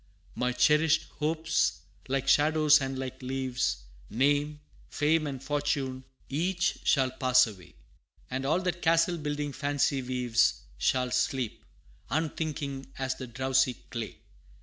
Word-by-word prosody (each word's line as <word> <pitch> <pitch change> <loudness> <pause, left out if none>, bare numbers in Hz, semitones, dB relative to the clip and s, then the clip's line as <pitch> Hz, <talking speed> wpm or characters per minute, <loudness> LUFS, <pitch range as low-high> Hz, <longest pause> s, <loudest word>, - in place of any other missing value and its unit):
My 125 0 0
cherished 150 +5 +3 0.2
hopes, 160 +2 0 0.3
like 135 0 -1
shadows 155 +1 +5
and 135 0 -3
like 130 0 -6
leaves, 130 - -2 0.3
Name, 145 +5 +1 0.3
fame, 155 +1 +1
and 135 -2 -6
fortune 140 -3 -2 0.2
each 175 +6 0
shall 130 -3 +3
pass 130 -1 +4
away; 95 -9 -11 0.6
And 130 +1 -2
all 155 +7 +1
that 180 -1 -2
castle 165 +1 +3
building 145 -1 -3
fancy 145 0 0
weaves, 125 -2 +1 0.2
Shall 125 - +1
sleep, 130 -4 -1 0.5
unthinking, 150 -3 -3
as 130 0 -1
the 130 - -8
drowsy 130 +1 +1 0.2
clay. 115 -3 -5
135 Hz, 125 wpm, -29 LUFS, 130-150 Hz, 0.6 s, shadows